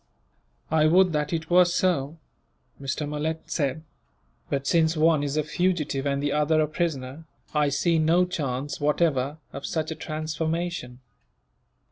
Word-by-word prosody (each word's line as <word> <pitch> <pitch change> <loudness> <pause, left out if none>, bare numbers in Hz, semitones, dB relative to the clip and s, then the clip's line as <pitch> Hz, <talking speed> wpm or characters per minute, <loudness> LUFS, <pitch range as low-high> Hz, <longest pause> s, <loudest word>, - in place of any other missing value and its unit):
"I 155 -1 +4
would 180 +2 +4
that 150 -1 -1
it 160 -1 -3
were 180 +1 +7
so," 170 -4 0 0.6
Mr. 140 +2 -3
Malet 155 +2 -3
said, 145 0 -1 0.7
"but 140 -1 -1
since 160 +1 +2
one 155 -1 +4
is 145 +1 -2
a 155 - +2
fugitive 150 -4 -1
and 140 0 -1
the 145 - 0
other 150 +2 +2
a 155 - +2
prisoner, 155 -2 -3 0.3
I 150 -1 +2
see 160 +4 +1
no 165 +3 +4
chance, 145 -5 -3
whatever, 145 -1 +1 0.2
of 140 - -7
such 160 -1 -2
a - - -3
transformation." 155 -4 -3
155 Hz, 145 wpm, -26 LUFS, 145-165 Hz, 0.7 s, were